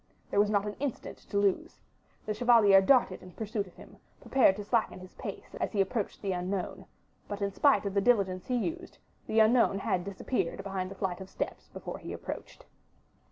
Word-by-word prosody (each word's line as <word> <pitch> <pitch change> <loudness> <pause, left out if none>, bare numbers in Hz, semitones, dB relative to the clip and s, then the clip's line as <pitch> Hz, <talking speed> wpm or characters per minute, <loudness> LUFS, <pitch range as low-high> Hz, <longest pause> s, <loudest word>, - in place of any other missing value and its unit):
There - - +2
was 205 0 +4
not 205 -1 +1
an 210 0 -4
instant 280 -3 -4
to 200 - -1
lose; 200 -2 0 0.5
the 215 - -1
chevalier 215 -4 +6
darted 235 -3 +3
in 180 -1 -13
pursuit 215 -2 -3
of 180 - -17
him, - - -14 0.2
prepared 260 -8 +4
to 205 - -6
slacken 220 -2 0
his 185 0 -12
pace - - -8
as - - -2
he 205 - -1
approached 205 +2 -1
the 195 - 0
unknown; 180 +1 -3 0.4
but 205 - -5
in 200 -1 -1
spite 280 -3 +4
of 200 - -2
the 200 - +2
diligence 195 -5 +2
he 250 - 0
used, 335 +9 -3 0.3
the 220 - +2
unknown 220 -2 +5
had 185 -2 -1
disappeared 195 -1 -2
behind 190 -2 -3
the 195 - -9
flight 190 -1 -3
of 190 - -8
steps - - -5
before - - -7
he - - -7
approached. - - -7
200 Hz, 200 wpm, -30 LUFS, 190-225 Hz, 0.5 s, chevalier